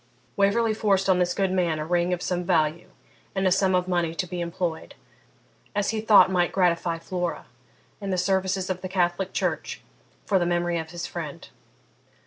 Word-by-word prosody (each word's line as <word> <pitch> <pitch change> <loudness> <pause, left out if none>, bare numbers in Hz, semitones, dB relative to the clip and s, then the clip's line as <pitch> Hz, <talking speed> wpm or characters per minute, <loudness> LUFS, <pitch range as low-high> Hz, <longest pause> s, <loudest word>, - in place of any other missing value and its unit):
Waverley 215 +2 +2
forced 195 -3 +1
on 185 -1 +4
this 180 0 +1
good 195 -2 +1
man 175 -4 +1
a 155 - -3
ring 175 +1 +1
of 180 0 -2
some 180 -1 -1
value 165 -2 0 0.5
and 190 0 0
a 185 - +3
sum 190 0 +3
of 180 0 +1
money 175 -2 0
to 180 - -1
be 180 0 -5
employed 170 -1 -4 0.8
(as 205 +1 +1
he 220 -1 -2
thought 205 -4 +6
might 175 -1 +2
gratify 170 -2 +1
Flora) 175 +1 -4 0.6
in 200 - -4
the 185 - 0
services 190 0 0
of 185 0 -4
the 185 - -5
Catholic 180 0 0
church - - -2 0.4
for 195 - +2
the 175 - +1
memory 175 -1 0
of 160 0 -6
his 175 0 -5
friend. - - -7
180 Hz, 185 wpm, -25 LUFS, 175-190 Hz, 0.8 s, thought